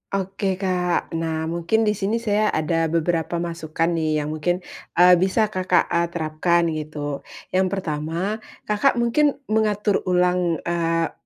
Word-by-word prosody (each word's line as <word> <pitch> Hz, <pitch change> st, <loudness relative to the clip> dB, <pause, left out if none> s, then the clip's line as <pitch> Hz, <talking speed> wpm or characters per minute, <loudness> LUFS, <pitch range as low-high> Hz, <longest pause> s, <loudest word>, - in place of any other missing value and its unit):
Oke, 195 Hz, 0 st, -1 dB
Kak. 180 Hz, -2 st, -1 dB
Nah, 160 Hz, 0 st, -2 dB
mungkin 170 Hz, +7 st, +1 dB
di 210 Hz, -, +3 dB
sini 210 Hz, +1 st, -1 dB
saya 215 Hz, -2 st, +1 dB
ada 165 Hz, -1 st, 0 dB
beberapa 165 Hz, +1 st, 0 dB
masukan 165 Hz, 0 st, -2 dB
nih 155 Hz, -2 st, 0 dB
yang 150 Hz, -, -4 dB
mungkin, 175 Hz, +4 st, -1 dB, 0.3 s
eee, 180 Hz, 0 st, +7 dB
bisa, 205 Hz, +4 st, +1 dB
Kakak, 185 Hz, -2 st, +1 dB
eee, 170 Hz, 0 st, +2 dB
terapkan, 170 Hz, +1 st, 0 dB
gitu. 150 Hz, -2 st, -4 dB, 0.3 s
Yang 185 Hz, 0 st, +2 dB
pertama, 175 Hz, +3 st, -2 dB, 0.2 s
Kakak, 210 Hz, +6 st, +2 dB
mungkin 245 Hz, +5 st, +2 dB, 0.2 s
mengatur 210 Hz, -2 st, +2 dB
ulang 180 Hz, -2 st, +1 dB
eee 165 Hz, -1 st, 0 dB
175 Hz, 140 wpm, -22 LUFS, 165-195 Hz, 0.3 s, eee